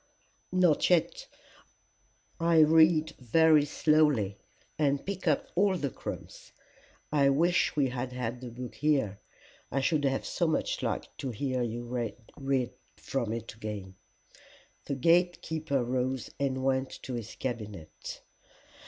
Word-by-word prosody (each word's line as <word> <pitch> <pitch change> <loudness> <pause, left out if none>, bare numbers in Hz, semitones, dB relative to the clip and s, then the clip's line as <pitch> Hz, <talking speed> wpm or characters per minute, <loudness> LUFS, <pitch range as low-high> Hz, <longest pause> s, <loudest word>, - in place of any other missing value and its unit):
"Not 180 -4 +3
yet. - - +1 1.1
I 165 0 +3
read 160 0 +5
very 155 +4 +5
slowly 145 -10 +2 0.4
and 140 -2 +1
pick 190 -2 -4
up 150 - +1
all 190 +1 +3
the 140 -5 -2
crumbs. - - -8 0.6
I 140 -2 +4
wish 170 +6 +2
we 140 -3 +2
had 125 0 -4
had 125 -1 -4
the 125 - -6
book 125 +1 -7
here. 135 -10 +1 0.5
I 135 - +1
should 145 +2 +1
have 135 0 0
so 170 - 0
much 160 - 0
liked - - -3
to 135 - -3
hear 130 +2 -2
you 120 0 -3
read 125 +2 -3 0.2
from 120 -5 -2
it 115 0 -5
again." 105 -3 -6 0.9
The 140 - -2
gate 175 +5 +3
keeper 155 -5 -1
rose 130 +1 -2
and 130 -2 -1
went 130 0 +1
to 130 - -5
his 115 -3 -5
cabinet. 105 -10 -6
135 Hz, 135 wpm, -29 LUFS, 120-155 Hz, 1.1 s, read